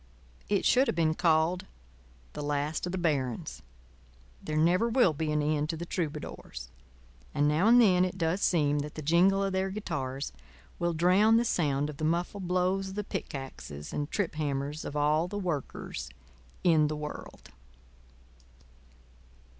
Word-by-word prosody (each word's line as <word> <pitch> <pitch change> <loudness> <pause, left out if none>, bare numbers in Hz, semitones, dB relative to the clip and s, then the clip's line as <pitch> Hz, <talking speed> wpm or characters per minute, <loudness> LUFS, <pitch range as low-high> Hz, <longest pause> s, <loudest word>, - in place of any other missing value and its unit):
It 200 -2 +1
should 260 +2 +4
have - - 0
been 160 -2 +2
called 165 +2 +2 0.7
"The - - -5
Last 145 +3 -1
of - - -3
the 185 - -2
Barons." 140 -9 -1 0.8
There 155 - -3
never 180 +8 +3
will 230 -8 +4
be 155 +1 -2
an 150 -1 +1
end 150 0 0
to 165 - -2
the 170 - -5
troubadours; 150 - -5 0.6
and 145 0 +3
now 155 +7 +3
and 240 +2 +7
then 185 -6 +5
it 185 0 -2
does 170 +2 0
seem 150 -5 +2
that 150 +1 -5
the 155 - -6
jingle 185 +6 +4
of 195 -1 -1
their 190 +1 0
guitars 140 -9 -4 0.5
will 175 -1 0
drown 190 +7 +5
the 235 - +2
sound 145 -8 +1
of 150 -2 -7
the 155 - -6
muffled 175 +4 -1
blows 185 +2 +1
of 190 - -8
the 210 - -2
pickaxes 135 - -6
and 145 0 -2
trip 200 -5 -1
hammers 145 0 -3
of 145 - -6
all 150 +3 +2
the 205 - -5
Workers 150 - -4 0.5
in 160 -4 +4
the 155 - -3
world. 150 - -8
160 Hz, 160 wpm, -29 LUFS, 150-185 Hz, 0.8 s, and